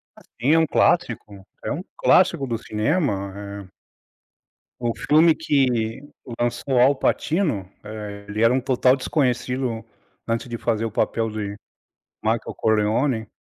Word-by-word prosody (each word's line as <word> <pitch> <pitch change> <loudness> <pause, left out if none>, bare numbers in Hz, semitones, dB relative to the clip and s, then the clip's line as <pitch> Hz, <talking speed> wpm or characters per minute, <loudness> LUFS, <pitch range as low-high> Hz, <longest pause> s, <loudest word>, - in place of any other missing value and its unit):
Ah - - -17
sim, 135 +7 0
é - - +5
um 160 - +2
clássico, 105 - 0 0.2
é - - -3
um - - -3
clássico 135 - +3
do 115 -3 -2
cinema, 105 - -1 0.3
eh - - -28 1.1
o 120 -1 -1
filme 160 +2 +4
que 125 -7 0 0.4
lançou 120 +2 0
Al 135 +3 +5
Pacino, 150 - 0
eh, 105 -1 -8
ele 105 +1 -3
era 115 +2 +5
um 130 - +2
total 130 0 +3
desconhecido 125 -3 -1 0.4
antes 115 +3 -1
de 115 - -4
fazer 115 -1 -1
o 115 - -3
papel 115 +1 0
de 105 -2 -4 0.7
Michael 110 +1 -1
Corleone. 110 +2 +1
115 Hz, 140 wpm, -23 LUFS, 110-135 Hz, 1.1 s, é